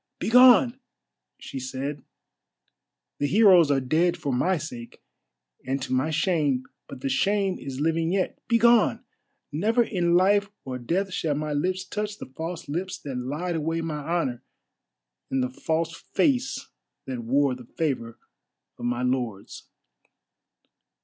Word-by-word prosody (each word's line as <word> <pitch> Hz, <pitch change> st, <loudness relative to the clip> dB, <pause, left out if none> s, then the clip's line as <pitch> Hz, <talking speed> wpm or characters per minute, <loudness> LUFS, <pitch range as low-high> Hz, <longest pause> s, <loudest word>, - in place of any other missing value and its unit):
"Begone!" 250 Hz, +1 st, +6 dB, 0.6 s
she 135 Hz, -, -7 dB
said, 135 Hz, +2 st, -4 dB, 1.2 s
"the 145 Hz, -, +1 dB
heroes 185 Hz, -5 st, +6 dB
are 140 Hz, -1 st, +3 dB
dead 165 Hz, +7 st, +1 dB
for 145 Hz, -5 st, -2 dB
my 180 Hz, +9 st, +1 dB
sake, 125 Hz, -7 st, -8 dB, 0.6 s
and 135 Hz, +2 st, -2 dB
to -, -, -3 dB
my 130 Hz, +4 st, +1 dB
shame, 155 Hz, -5 st, +1 dB, 0.2 s
but 135 Hz, -2 st, -10 dB
the -, -, -2 dB
shame 195 Hz, +5 st, +1 dB
is 135 Hz, -1 st, -6 dB
living 165 Hz, +2 st, +1 dB
yet. 190 Hz, -1 st, -1 dB
Begone! 235 Hz, 0 st, +4 dB, 0.5 s
Never 220 Hz, +11 st, +2 dB
in 175 Hz, -6 st, +1 dB
life 200 Hz, +3 st, +4 dB, 0.2 s
or 130 Hz, -1 st, -5 dB
death 180 Hz, +10 st, -1 dB
shall 155 Hz, -4 st, -1 dB
my 150 Hz, 0 st, -2 dB
lips 185 Hz, +6 st, -1 dB
touch 210 Hz, +2 st, -4 dB
the -, -, -8 dB
false 165 Hz, +5 st, -6 dB
lips 180 Hz, +6 st, -3 dB
that 140 Hz, -3 st, -7 dB
lied 150 Hz, +8 st, -3 dB
away 165 Hz, +1 st, -1 dB
my 160 Hz, -2 st, -3 dB
honour, 145 Hz, -5 st, -2 dB, 0.9 s
and 130 Hz, -1 st, 0 dB
the 125 Hz, -, -2 dB
false 160 Hz, +4 st, -2 dB
face 265 Hz, -, -1 dB, 0.4 s
that 130 Hz, -2 st, -4 dB
wore 135 Hz, +3 st, +2 dB
the 125 Hz, -1 st, -9 dB
favour 130 Hz, -8 st, -2 dB, 0.6 s
of -, -, -5 dB
my 120 Hz, +1 st, -1 dB
lord's." 125 Hz, -6 st, -3 dB
160 Hz, 140 wpm, -25 LUFS, 130-185 Hz, 1.2 s, Begone